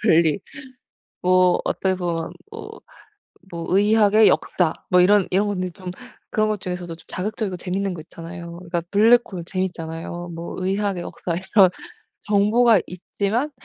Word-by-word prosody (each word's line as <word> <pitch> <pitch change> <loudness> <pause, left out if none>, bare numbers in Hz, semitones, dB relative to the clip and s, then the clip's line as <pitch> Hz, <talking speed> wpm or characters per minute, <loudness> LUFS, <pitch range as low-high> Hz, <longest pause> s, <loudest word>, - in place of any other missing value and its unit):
분리 165 -3 +4 0.8
뭐 185 0 +4
어떻게 190 -1 0
보면 170 -3 -3 0.2
뭐 445 0 -9 0.7
뭐 170 -1 -5
의학의 210 +1 +5
역사 170 -4 +2 0.2
뭐 180 0 +5
이런 200 +1 +4
이런 200 +3 +2
것들이 185 -3 -2
좀 185 0 -8 0.4
그런 215 0 +2
것 215 -1 -1
중에서도 180 -2 -5
좀 165 - -19
자극적이고 205 0 -3
재밌는 190 +2 -2
거 165 - -7
있잖아요. 170 +1 -9
그러니까 175 -1 -3
블랙홀 215 -3 +3
재밌잖아요. 175 -1 -4
뭐 165 +1 -6
의학의 190 -1 -1
역사 170 -1 -4
이런 190 +1 +4 0.6
정보가 210 +2 +4
있지만 200 - -2
185 Hz, 310 characters per minute, -22 LUFS, 175-205 Hz, 0.8 s, 의학의